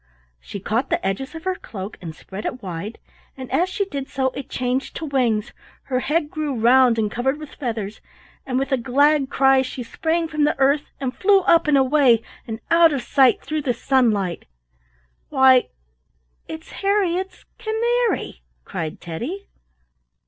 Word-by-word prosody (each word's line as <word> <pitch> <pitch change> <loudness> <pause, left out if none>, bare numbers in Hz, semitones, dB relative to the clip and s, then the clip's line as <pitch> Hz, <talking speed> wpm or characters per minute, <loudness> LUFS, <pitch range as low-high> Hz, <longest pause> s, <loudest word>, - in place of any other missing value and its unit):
She 200 - -8
caught 225 +7 -1
the - - -1
edges 265 - -3
of 325 - -8
her 375 - 0
cloak 205 - -8
and 165 -3 -7
spread 195 +5 -9
it 250 - -6
wide, 185 +4 -6 0.4
and 260 -1 -8
as 345 +8 +2
she 400 +1 -1
did 280 -7 -5
so 260 -1 0
it 275 0 -8
changed 255 +2 -2
to 325 - -4
wings, 245 -7 0 0.3
her 255 -2 -1
head 300 +3 -1
grew 300 -3 -2
round 245 +1 +5
and 215 -2 0
covered 265 +5 -1
with 305 -1 -10
feathers, 220 -5 -4 0.4
and 255 -1 -2
with 270 +1 -1
a 265 - +3
glad 275 +3 +2
cry 270 -1 +4
she 255 -1 -5
sprang 325 +7 -1
from 305 -1 -1
the 295 - +2
earth 280 +2 +2
and 265 -2 -3
flew 395 0 +4
up 335 -3 +4
and 295 -2 +4
away 260 -4 +4 0.2
and 225 -1 -5
out 335 -1 +6
of 275 -4 -2
sight 260 +1 +3
through 310 +2 -2
the 255 -4 -1
sunlight. 215 -9 +1 0.8
"Why, 265 -3 +5 0.8
it's 320 0 -9
Harriett's 380 -2 0
canary!" 460 - -1 0.2
cried 160 -2 -5
Teddy. 250 - -6
265 Hz, 165 wpm, -22 LUFS, 235-310 Hz, 0.8 s, out